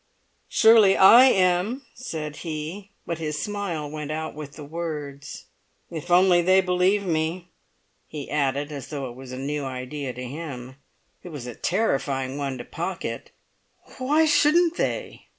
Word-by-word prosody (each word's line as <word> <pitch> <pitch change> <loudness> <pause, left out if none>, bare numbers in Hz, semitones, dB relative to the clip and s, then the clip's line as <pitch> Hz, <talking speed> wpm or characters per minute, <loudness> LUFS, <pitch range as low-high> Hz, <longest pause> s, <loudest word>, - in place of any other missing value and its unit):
"Surely 220 -3 +6
I 230 +7 +9
am," 190 +3 +2
said 155 - -6
he; 165 +5 -6 0.2
but 170 -1 -4
his 150 -1 -3
smile 200 -7 -3
went 150 0 -6
out 160 +1 -4
with 150 -2 -8
the 145 - -10
words. 150 -3 -6 0.5
"If 165 +1 -6
only 180 0 +5
they 185 +2 +5
believe 190 +2 +2
me!" 170 +1 -2 0.6
he 150 -3 -7
added 145 0 0
as 140 -3 -7
though 140 -4 -5
it - - -13
was 130 0 -10
a 130 - -6
new 145 +2 -3
idea 130 +1 -5
to 125 +1 -8
him. 130 -2 -7 0.4
It 180 - -10
was 145 -7 -7
a 125 - -6
terrifying 135 - -1
one 135 -2 -3
to 120 - -8
Pocket. - - -5 0.7
"Why 295 +5 +3
shouldn't 320 +3 +4
they?" - - -3
155 Hz, 150 wpm, -24 LUFS, 140-185 Hz, 0.7 s, I